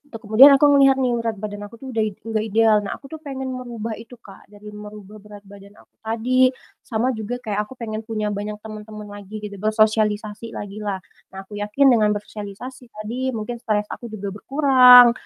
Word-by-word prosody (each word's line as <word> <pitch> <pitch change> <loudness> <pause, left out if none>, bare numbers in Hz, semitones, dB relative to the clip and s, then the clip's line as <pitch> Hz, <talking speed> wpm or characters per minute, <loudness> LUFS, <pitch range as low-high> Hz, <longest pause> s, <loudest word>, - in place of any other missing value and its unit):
tuh - - -6
kemudian 220 +7 +8
aku 275 - +1
melihat 270 -1 +6
nih, 255 -2 +1
berat 230 -1 -2
badan 205 -1 -5
aku 225 - -14
tuh 265 +3 -11
udah 225 - -2
id 215 -2 -1
nggak 225 -1 -2
ideal, 220 0 +4
nah 200 - -4
aku 275 - -15
tuh 315 - -7
pengen 265 -3 -6
merubah 235 -3 -5
itu 230 +2 -12
Kak, 195 -3 -16
dari 210 0 -15
merubah 210 0 -11
berat 205 -1 -13
badan 200 0 -15
aku - - -22 0.2
tadi 225 +2 -3 0.6
sama 235 +2 0
juga 220 0 -4
kayak 210 -2 -2
aku 260 - -12
pengen 220 -3 -5
punya 215 -2 -2
banyak 205 +1 -4
temen-temen 215 -1 -9
lagi 205 +1 -9
gitu, 205 -1 -6
bersosialisasi 215 0 0
lagi 205 0 -7
lah. 205 -2 -3 0.4
Nah, 195 - -7
aku 205 +1 -9
yakin 235 +7 +3
dengan 210 -3 +3
bersosialisasi 210 +5 -8
tadi 235 +4 -4
mungkin 235 +2 -5
stres 210 -2 0
aku 240 - -7
juga 205 -3 -6
berkurang, 250 -2 +7
215 Hz, 195 wpm, -21 LUFS, 210-245 Hz, 0.6 s, kemudian